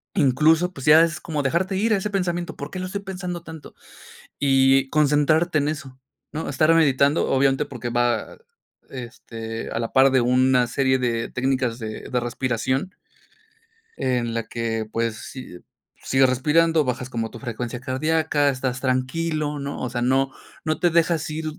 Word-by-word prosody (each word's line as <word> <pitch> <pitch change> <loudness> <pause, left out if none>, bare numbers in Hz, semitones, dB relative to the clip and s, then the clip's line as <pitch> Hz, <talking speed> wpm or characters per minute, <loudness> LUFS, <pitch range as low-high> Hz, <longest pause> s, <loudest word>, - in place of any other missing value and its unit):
Incluso, 160 +3 +3
pues 135 - -8
ya 150 +2 +7
es 165 -2 0
como 155 -3 -3
dejarte 170 +8 0
ir 220 +3 +2
a - - +3
ese 200 +2 -3
pensamiento 175 -3 -2
¿Por 145 +1 -7
qué 185 - -6
lo 185 - -4
estoy 200 +2 -4
pensando 180 -3 -6
tanto? 160 -3 -11 0.7
Y 135 -1 +4
concentrarte 155 +3 +2
en 145 - 0
eso 135 -4 -5 0.3
¿no? 155 +1 -4
Estar 155 +4 +3
meditando, 145 -2 +3
obviamente, 135 +2 +2
porque 125 -4 -6
va, 120 -1 -1 0.5
este, 115 -3 -7
a - - -4
la 115 0 -3
par 135 +1 +6
de 130 -1 +3
una 125 +1 +3
serie 130 +2 +1
de 115 -2 -1
técnicas 130 -2 -1
de 110 -2 -7
de 125 - 0
respiración. 130 - -2 1.0
En 120 -2 -1
la 115 0 -2
que, 115 -2 -3
pues, 115 0 -2
si 125 -7 -9 0.4
sigues 135 -1 +3
respirando, 155 +4 +2
bajas 125 0 -3
como 115 -3 -3
tu - - -10
frecuencia 120 -1 -5
cardíaca, 150 +2 0
estás 130 -2 -2
tranquilo, 145 +4 -1
¿no? 140 0 -5
O 125 - -2
sea, 120 - -3
no 135 +2 +2 0.3
no 155 -1 -1
te 175 - +3
dejas 165 -1 +1
ir 155 +1 -4
135 Hz, 165 wpm, -23 LUFS, 125-160 Hz, 1.0 s, ya